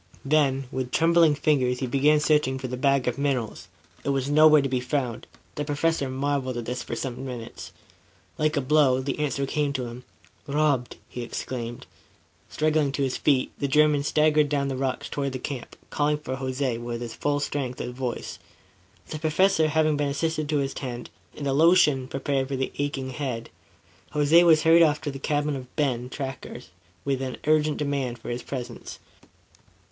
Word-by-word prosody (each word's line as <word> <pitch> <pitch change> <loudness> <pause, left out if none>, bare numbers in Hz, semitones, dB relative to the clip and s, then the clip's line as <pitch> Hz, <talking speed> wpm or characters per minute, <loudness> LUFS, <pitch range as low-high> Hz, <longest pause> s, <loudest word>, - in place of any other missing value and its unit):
Then, 135 -2 +2
with 130 -1 -3
trembling 165 0 +4
fingers 135 -4 +1
he 130 - -2
began 140 +4 +3
searching 150 -3 +2
for 130 -1 -5
the 125 - -4
bag 140 0 +2
of 125 +2 -1
minerals. 135 -6 -2 0.4
It - - -2
was 135 0 0
nowhere 155 -1 +7
to - - 0
be 130 -1 0
found. 125 -2 -3 0.3
The 150 - -3
Professor 145 -1 0
marveled 135 -1 -1
at 120 - -4
this 125 +1 -3
for - - -5
some 130 -1 -4
minutes. 125 -4 -7 0.7
Like 155 -1 +1
a - - +2
blow, 135 -1 +3
the 135 +2 -3
answer 140 -2 -1
came 145 0 -1
to 130 -2 -2
him. 120 +1 -8 0.4
"Robbed!" 140 -4 +1
he 125 - -7
exclaimed. 120 0 -5 0.6
Struggling 155 -2 +1
to 140 - 0
his 130 -1 -1
feet, 135 -3 +1
the 140 - 0
German 150 +1 +4
staggered 150 0 +3
down 140 -1 0
the 135 - -2
rocks 130 0 -2
toward 140 -2 -3
the - - -2
camp, 130 -1 -6 0.2
calling 150 0 +1
for 130 -3 -5
Jose 130 -2 -2
with 120 0 -5
the 120 - -3
full 145 +5 -1
strength 135 -3 -3
of - - -3
his 125 - -9
voice. 125 -2 -4 0.7
The 155 - -5
Professor 160 +1 +3
having 155 -1 +2
been 145 -1 0
assisted 155 +1 -1
to 150 - +1
his 140 -1 -1
tent 120 -3 -6 0.3
and 145 - -5
a 135 - +1
lotion 150 -4 +4
prepared 135 0 -1
for 140 - -3
his 130 0 -2
aching 140 -2 -2
head, 125 -4 -4 0.6
Jose 150 +3 +5
was 160 -3 +5
hurried 165 +1 +6
off 150 -3 +4
to 150 -2 -3
the 135 - -8
cabin 145 +1 0
of 130 -2 -9
Ben 125 -5 0
Tackers 130 -3 -7 0.4
with 135 -1 0
an 130 -1 -4
urgent 155 0 +2
demand 140 -4 -2
for 115 - -7
his 120 +1 -3
presence. 125 -3 -7
140 Hz, 185 wpm, -25 LUFS, 130-150 Hz, 0.7 s, nowhere